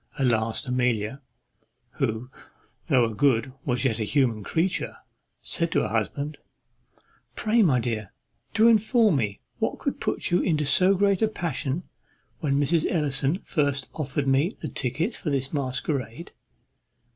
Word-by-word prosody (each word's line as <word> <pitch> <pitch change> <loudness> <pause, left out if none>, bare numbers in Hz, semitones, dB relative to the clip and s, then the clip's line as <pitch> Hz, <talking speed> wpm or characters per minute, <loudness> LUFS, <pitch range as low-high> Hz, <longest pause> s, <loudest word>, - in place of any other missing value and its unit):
At 135 - +1
last 115 +2 0
Amelia, 125 0 0 0.8
who, 125 -1 -2 0.6
though 125 -3 +4
a 115 - -3
good, 130 0 +2
was 125 +1 0
yet 115 -3 +1
a - - 0
human 115 -3 +1
creatures 170 - -1 0.5
said - - 0
to - - +3
her - - -2
husband, 145 +1 -2 1.0
"Pray, 225 +1 +2
my 145 - +4
dear, 110 -4 -3 0.4
do 220 +2 +6
inform 220 - +4
me 105 -5 -2 0.2
what - - -1
could - - -3
put - - -2
you 175 - +4
into 155 -4 +1
so 185 +7 +4
great 200 0 +2
a 220 - +4
passion 165 -5 -3 0.6
when 140 -3 +1
Mrs. 155 +3 +2
Ellison 145 +1 0
first 145 -4 -1
offered 145 -1 -2
me 135 +5 +3
the - - -4
tickets 145 - -2
for 155 - -3
this 135 0 -1
masquerade?" 135 +1 -3
140 Hz, 145 wpm, -26 LUFS, 125-170 Hz, 1.0 s, do